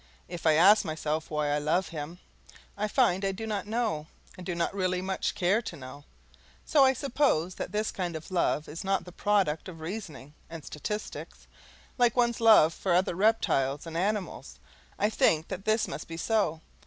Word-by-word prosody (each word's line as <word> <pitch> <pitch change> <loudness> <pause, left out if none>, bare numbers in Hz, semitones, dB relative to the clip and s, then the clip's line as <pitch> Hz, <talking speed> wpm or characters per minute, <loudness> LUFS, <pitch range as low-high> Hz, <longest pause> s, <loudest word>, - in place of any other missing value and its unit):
If 170 -2 -4
I 155 - +6
ask 195 +7 +6
myself 155 0 -3
why 150 -1 -1
I 145 0 +1
love 160 +5 0
him, 160 +1 -6 0.6
I 210 +1 -1
find 205 -5 +2
I 195 - +1
do 215 +4 -6
not 205 -3 -3
know, 215 -9 -1 0.3
and 185 - -10
do 180 -1 -3
not 170 +2 -1
really 185 -2 0
much 190 +1 -2
care 190 +5 +2
to 195 - -7
know; 140 0 -11 0.6
so 290 -3 +4
I 265 0 +5
suppose 255 - 0
that - - -6
this 215 +1 -1
kind 175 -3 -4
of 160 +4 -8
love 170 -4 0
is 155 +3 -7
not 195 -2 -1
a - - -8
product 190 -4 0
of 165 -3 -10
reasoning 160 -5 -7 0.2
and 165 -3 -9
statistics, 210 +8 -6 0.5
like 240 -2 +3
one's 235 -2 +1
love 215 -8 +6
for 185 -3 0
other 180 0 +2
reptiles 170 -9 +1
and 165 -1 -8
animals. 200 +3 -2 0.4
I 210 - +1
think 160 -6 +2
that 190 - -6
this 220 0 +2
must 155 - -6
be 165 - -7
so. 170 -5 0
180 Hz, 190 wpm, -28 LUFS, 160-210 Hz, 0.6 s, I